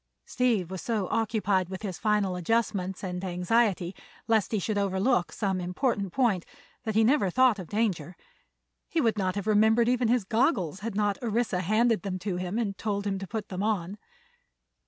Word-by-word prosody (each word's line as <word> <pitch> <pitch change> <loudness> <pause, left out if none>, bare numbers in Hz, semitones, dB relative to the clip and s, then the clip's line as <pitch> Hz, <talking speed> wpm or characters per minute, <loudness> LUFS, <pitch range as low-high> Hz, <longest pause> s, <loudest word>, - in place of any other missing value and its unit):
Steve 230 -8 0
was 190 - -5
so 215 -5 -1
occupied 205 -5 +1
with 190 +2 -7
his 190 -4 -4
final 210 -4 +1
adjustments 190 0 -1
and 180 -1 -4
anxiety 185 0 +1 0.3
lest 225 -3 +2
he 220 - +1
should 210 +2 -1
overlook 195 +1 +1
some 195 -3 -1
important 195 +2 -1
point, 210 -6 +1 0.4
that 220 -2 -2
he 220 - +5
never 240 -4 +3
thought 250 0 +3
of 180 - -7
danger. 190 -7 -1 0.7
He 335 - 0
would 225 -6 +1
not 185 -1 0
have 200 -1 -3
remembered 220 +2 +4
even 250 -1 +2
his 240 -1 +2
goggles 195 - +1
had 215 0 -5
not 205 -1 0
Orissa 230 -4 0
handed 215 +5 +2
them 190 -2 -3
to 185 0 -3
him 180 +3 -3
and 210 -4 -1
told 205 -2 -2
him 195 -1 -1
to 195 - -6
put 220 -1 -5
them 185 0 -4
on. 205 -2 -1
205 Hz, 180 wpm, -28 LUFS, 185-225 Hz, 0.7 s, he